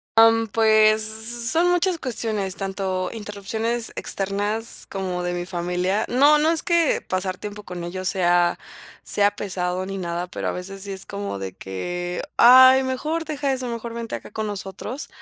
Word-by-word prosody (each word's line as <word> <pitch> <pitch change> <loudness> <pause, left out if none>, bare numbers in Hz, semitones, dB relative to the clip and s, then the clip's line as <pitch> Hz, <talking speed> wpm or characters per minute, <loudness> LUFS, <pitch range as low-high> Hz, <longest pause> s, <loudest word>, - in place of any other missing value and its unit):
Am, 225 0 +5
pues, 215 0 +4
son 235 +10 +3
muchas 355 -1 +1
cuestiones, 215 -6 -2
tanto 190 -1 -3
interrupciones 220 +2 -3
externas 205 +3 -3
como 185 -2 -3
de 175 0 -2
mi 175 0 -3
familia, 180 +3 -1
no 285 +5 +5
no 310 +2 +3
es 330 -1 0
que 340 -3 +2
pasar 185 0 -2
tiempo 210 0 -7
con 180 -2 -7
ellos 185 +2 -3
sea 175 -1 +2 0.5
sea 205 0 +3
pesado 185 -2 -3
ni 195 0 -5
nada, 175 0 -3
pero 180 - -5
a - - 0
veces 195 +2 -7
sí 200 0 -4
es 190 0 -4
como 200 - -5
de 95 -2 -6
que: 175 - -5
"Ay, 260 +2 +8
mejor 305 +6 -2
deja 285 -3 -1
eso, 255 -1 -3
mejor 235 0 -5
vente 235 -1 -5
acá - - -10
con 220 -1 -3
nosotros", 200 +7 -5
205 Hz, 165 wpm, -23 LUFS, 185-235 Hz, 0.5 s, Ay